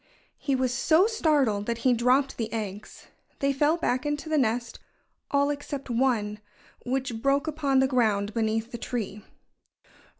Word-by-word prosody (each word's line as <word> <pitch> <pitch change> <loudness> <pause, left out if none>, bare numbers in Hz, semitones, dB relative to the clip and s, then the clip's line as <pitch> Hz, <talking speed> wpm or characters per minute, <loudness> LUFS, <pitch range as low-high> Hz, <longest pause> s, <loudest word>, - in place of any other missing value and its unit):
He 275 - 0
was 255 -1 0
so 315 +9 +4
startled 290 - +1
that 235 -1 -1
he 255 - +5
dropped 250 +4 +2
the 225 -2 -3
eggs. 210 -2 -6 0.3
They 275 0 +1
fell 295 +4 +2
back 255 -6 0
into 295 +1 -3
the 310 - +2
nest 235 -1 -1 0.5
all 280 0 +2
except 285 -2 -5
one, 230 -4 0 0.4
which 250 -3 -2
broke 275 +3 +2
upon 295 -3 0
the 265 - +3
ground 215 -5 +1
beneath 225 +1 -1
the 235 - -6
tree. 215 -4 -4
255 Hz, 155 wpm, -27 LUFS, 225-280 Hz, 0.5 s, he